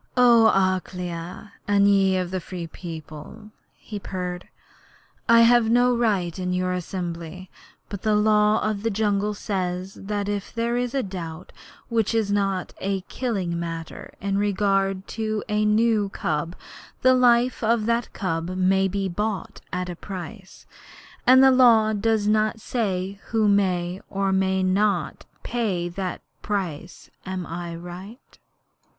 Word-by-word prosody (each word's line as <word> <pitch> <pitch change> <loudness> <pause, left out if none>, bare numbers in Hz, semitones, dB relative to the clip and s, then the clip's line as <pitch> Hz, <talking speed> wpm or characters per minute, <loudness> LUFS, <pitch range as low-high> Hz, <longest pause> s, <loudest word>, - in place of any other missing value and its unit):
'O 235 -2 +7
Akela, 180 0 -2
and 200 0 +4
ye 195 -2 +3
the 185 +1 -4
Free 180 -1 -6
People,' 165 +5 -9 0.3
he 210 -2 -7
purred, 180 -2 -5 0.8
'I 230 0 +7
have 235 -1 +5
no 245 +1 +4
right 200 -7 0
in 180 0 -1
your 180 0 0
assembly; 180 0 -5 0.4
but 200 -2 -7
the 215 -1 +2
Law 210 0 +3
of 210 -2 -2
the 225 - 0
Jungle 210 0 0
says 185 -2 -3
that 205 0 -4
if 205 -1 -3
there 235 +1 0
is 245 +2 -1
a 270 - +1
doubt 180 -3 -7 0.4
which 230 -1 0
is 215 -3 +1
not 195 -2 0
a 195 0 -1
killing 190 -6 -3
matter 165 -1 -6
in 200 0 -1
regard 195 -1 0
to 215 -1 -2
a 210 -1 +1
new 215 -1 +2
cub, 165 -1 -2 0.5
the 255 0 +6
life 250 -1 +3
of 225 -1 +2
that 235 +1 0
cub 165 -3 -3
may 190 +1 +3
be 195 +1 -2
bought 200 +1 -3
at 180 0 -2
a 175 - -5
price. 190 +2 -9 0.6
And 260 +1 +8
the 265 - +7
Law 230 -4 +5
does 215 0 +1
not 215 +1 +2
say 195 -4 -2
who 220 -2 +2
may 185 -2 +1
or 195 0 0
may 190 0 +1
not 185 -3 0 0.2
pay 200 -8 -1
that 185 0 -4 0.2
price. 180 -5 -4
Am 185 -1 -4
I 170 +1 -5
right?' 180 +8 -11
195 Hz, 145 wpm, -24 LUFS, 180-215 Hz, 0.8 s, And